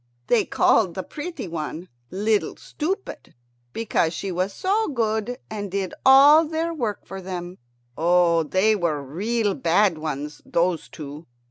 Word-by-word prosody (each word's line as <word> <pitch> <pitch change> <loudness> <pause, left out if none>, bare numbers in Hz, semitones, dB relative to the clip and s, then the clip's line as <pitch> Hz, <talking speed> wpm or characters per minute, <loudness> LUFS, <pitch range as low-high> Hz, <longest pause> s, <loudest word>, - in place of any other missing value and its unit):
They 235 - +3
called 190 -7 +2
the 190 - -3
pretty 320 - -6
one 165 +1 -5 0.2
"Little 210 +4 0
Stupid," 380 +6 -5 0.4
because 175 - 0
she 195 +2 -4
was 185 +2 -1
so 405 - 0
good 230 -2 -1
and 205 -2 -5
did 190 -1 -3
all 280 +4 +8
their 325 +1 -2
work 230 -10 -3
for 195 0 -8
them. 180 -1 -6 0.4
Oh, 170 0 +3
they 190 +7 +2
were 165 -7 -1
real 205 - -1
bad 175 0 +2
ones, 150 -1 -5
those 170 -1 0
two. 150 +1 -9
195 Hz, 140 wpm, -23 LUFS, 170-235 Hz, 0.4 s, all